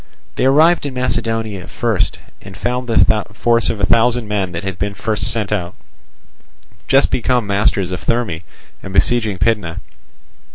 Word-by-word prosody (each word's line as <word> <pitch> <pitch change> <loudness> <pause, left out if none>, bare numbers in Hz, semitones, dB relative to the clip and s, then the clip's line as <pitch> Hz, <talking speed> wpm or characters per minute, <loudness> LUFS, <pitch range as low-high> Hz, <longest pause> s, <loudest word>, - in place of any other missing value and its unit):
They - - 0
arrived 155 +4 +4
in 135 - -7
Macedonia 115 -6 -2
first, 115 -5 -1 0.2
and 95 -1 -11
found 125 +4 -2
the 115 - +1 0.4
force 115 +1 +2
of 105 - -2
a 100 - +2
thousand 115 +3 +2
men 100 -3 -1
that 85 +1 -5
had 95 -2 -5
been 100 0 -2
first 105 -3 -2
sent 105 -3 -2
out, 90 -4 -2 1.1
just 135 0 +3
become 125 -1 +1
masters 100 -2 +1
of 90 - -5
Therme 115 -9 -1 0.4
and 95 - -8
besieging 110 -2 +2
Pydna. 100 -6 0
110 Hz, 155 wpm, -18 LUFS, 95-120 Hz, 1.1 s, arrived